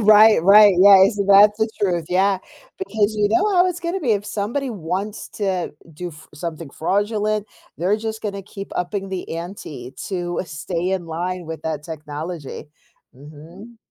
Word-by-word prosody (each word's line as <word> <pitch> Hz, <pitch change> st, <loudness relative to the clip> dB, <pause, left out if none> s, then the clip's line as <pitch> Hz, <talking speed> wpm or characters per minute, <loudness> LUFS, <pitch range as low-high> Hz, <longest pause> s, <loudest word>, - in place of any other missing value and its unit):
Right, 215 Hz, -3 st, +6 dB
right, 205 Hz, +1 st, +7 dB
yeah, 195 Hz, 0 st, +8 dB
isn't 200 Hz, -2 st, -2 dB
that's 205 Hz, +2 st, +6 dB
the 220 Hz, -, +1 dB
truth, 175 Hz, -4 st, 0 dB
yeah, 190 Hz, +2 st, +2 dB, 0.4 s
because 220 Hz, -, 0 dB
you 205 Hz, -1 st, +2 dB
know 410 Hz, -, +2 dB
how 360 Hz, 0 st, +5 dB
it's 355 Hz, -1 st, -4 dB
gonna 345 Hz, +3 st, -3 dB
be 245 Hz, -9 st, +1 dB
if 205 Hz, 0 st, -1 dB
somebody 235 Hz, +8 st, -3 dB
wants 195 Hz, +2 st, -4 dB
to 190 Hz, -4 st, -2 dB, 0.2 s
do 180 Hz, +3 st, -5 dB
f 155 Hz, -1 st, -14 dB
something 160 Hz, -1 st, -6 dB
fraudulent, 210 Hz, +5 st, -1 dB, 0.3 s
they're 190 Hz, +5 st, +1 dB
just 220 Hz, 0 st, -5 dB
gonna 200 Hz, -2 st, -4 dB
keep 195 Hz, 0 st, -9 dB
upping 195 Hz, +2 st, -3 dB
the 185 Hz, -3 st, -5 dB
ante 155 Hz, -8 st, -8 dB
to 175 Hz, -2 st, -3 dB
stay 170 Hz, +3 st, -3 dB
in 185 Hz, -3 st, -2 dB
line 175 Hz, +2 st, -4 dB
with 160 Hz, 0 st, -7 dB
that 155 Hz, -2 st, -3 dB
technology. 155 Hz, 0 st, -7 dB, 0.5 s
Mhm. 160 Hz, -, -13 dB
195 Hz, 165 wpm, -21 LUFS, 170-210 Hz, 0.5 s, yeah